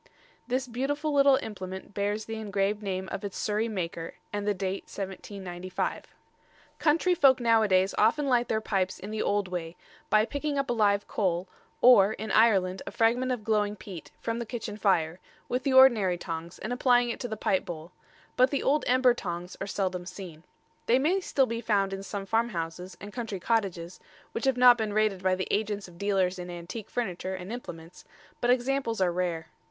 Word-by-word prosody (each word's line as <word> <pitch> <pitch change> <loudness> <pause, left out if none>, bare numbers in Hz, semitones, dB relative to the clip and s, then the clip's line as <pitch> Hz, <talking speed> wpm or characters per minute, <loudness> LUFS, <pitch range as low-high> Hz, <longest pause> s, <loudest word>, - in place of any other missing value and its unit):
This 255 +2 0
beautiful 290 +5 -2
little 275 -1 +6
implement 190 -2 -7
bears 205 +2 -1
the 225 0 -5
engraved 205 0 -1
name 190 -2 -3
of 200 - -5
its 200 -2 -5
Surrey 215 +2 0
maker, 170 -6 -4 0.2
and 205 0 -2
the 205 - +3
date 190 0 -3
1795. 190 -2 -5 0.7
Country 330 +4 +3
folk 270 -6 +5
nowadays 215 -5 +3
often 260 +8 +3
light 245 -3 +2
their 220 - +1
pipes 190 -3 -1
in 200 +3 -8
the 220 - -2
old 205 -1 0
way, 175 -2 -5 0.3
by 215 +1 +4
picking 285 +2 -3
up 275 -2 0
a - - +2
live 205 -3 +2
coal, 180 -2 -1 0.4
or, 215 -5 +7
in 215 +1 -5
Ireland, 190 -5 +3
a - - -4
fragment 240 +3 +2
of 245 -4 -3
glowing 210 -1 +1
peat, 190 -5 -10
from 230 0 -3
the 235 - -3
kitchen 220 -3 -5
fire, 180 -5 +1 0.3
with 250 +1 -1
the 270 0 0
ordinary 230 -9 +6
tongs, 165 0 -6
and 240 - -4
applying 245 -1 +3
it - - -6
to 245 - -3
the 220 -2 -5
pipe 190 -1 +1
bowl; 165 0 -8 0.4
but 255 +1 +5
the 280 - -1
old 295 +2 +2
ember 255 0 +5
tongs 175 -5 -5
are 195 - -3
seldom 185 -3 -2
seen. 180 -4 -9 0.5
They 240 - +5
may 325 +9 +2
still 280 -7 +1
be 230 -1 -4
found 200 -4 +1
in 195 - -4
some 195 0 -5
farmhouses 185 -5 -2
and 205 0 -9
country 225 -6 -4
cottages, 185 -5 -1 0.3
which 230 - -3
have 265 -2 +2
not 245 -1 +7
been 215 -2 -1
raided 215 -3 +1
by 185 0 +2
the 185 - -3
agents 205 -1 -1
of 175 -1 -16
dealers 190 -2 +1
in 180 0 -6
antique 175 +5 -7
furniture 190 -5 -3
and 185 +4 -7
implements, 165 -8 -9 0.4
but 240 - 0
examples 250 -2 +1
are 185 -2 +2
rare. 175 -2 -2
205 Hz, 190 wpm, -28 LUFS, 185-240 Hz, 0.7 s, or